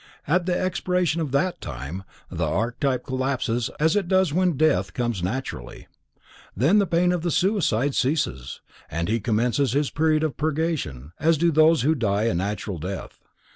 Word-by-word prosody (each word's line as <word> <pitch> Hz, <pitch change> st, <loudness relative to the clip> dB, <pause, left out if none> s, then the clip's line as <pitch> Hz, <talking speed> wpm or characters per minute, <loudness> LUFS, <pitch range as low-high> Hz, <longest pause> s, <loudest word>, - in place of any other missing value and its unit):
At 175 Hz, +4 st, +1 dB
the 180 Hz, -1 st, +1 dB
expiration 180 Hz, -2 st, 0 dB
of 150 Hz, -5 st, -3 dB
that 155 Hz, +7 st, 0 dB
time, 70 Hz, +5 st, -6 dB, 0.3 s
the -, -, -1 dB
archetype 125 Hz, +3 st, -1 dB
collapses 130 Hz, -3 st, -1 dB
as 160 Hz, +4 st, +3 dB
it 200 Hz, -4 st, 0 dB
does 185 Hz, -4 st, +2 dB
when 180 Hz, -3 st, +1 dB
death 100 Hz, -, +1 dB
comes 120 Hz, -6 st, -1 dB
naturally. 90 Hz, -, -5 dB, 0.7 s
Then 165 Hz, -, +4 dB
the 200 Hz, -, +2 dB
pain 175 Hz, +1 st, +2 dB
of 180 Hz, -2 st, -1 dB
the 175 Hz, -, -1 dB
suicide 160 Hz, -, +1 dB
ceases, 65 Hz, -, -1 dB, 0.3 s
and 85 Hz, +1 st, -2 dB
he 115 Hz, +2 st, +1 dB
commences 120 Hz, +4 st, +1 dB
his 145 Hz, 0 st, 0 dB
period 155 Hz, 0 st, +2 dB
of 155 Hz, -3 st, -2 dB
purgation 150 Hz, -, -2 dB
as 160 Hz, 0 st, +3 dB
do 170 Hz, +2 st, +2 dB
those 155 Hz, -2 st, +4 dB
who 155 Hz, +4 st, +3 dB
die 105 Hz, -7 st, 0 dB
a 115 Hz, -, +1 dB
natural 100 Hz, 0 st, -3 dB
death. 95 Hz, +4 st, -6 dB
140 Hz, 170 wpm, -24 LUFS, 110-165 Hz, 0.7 s, Then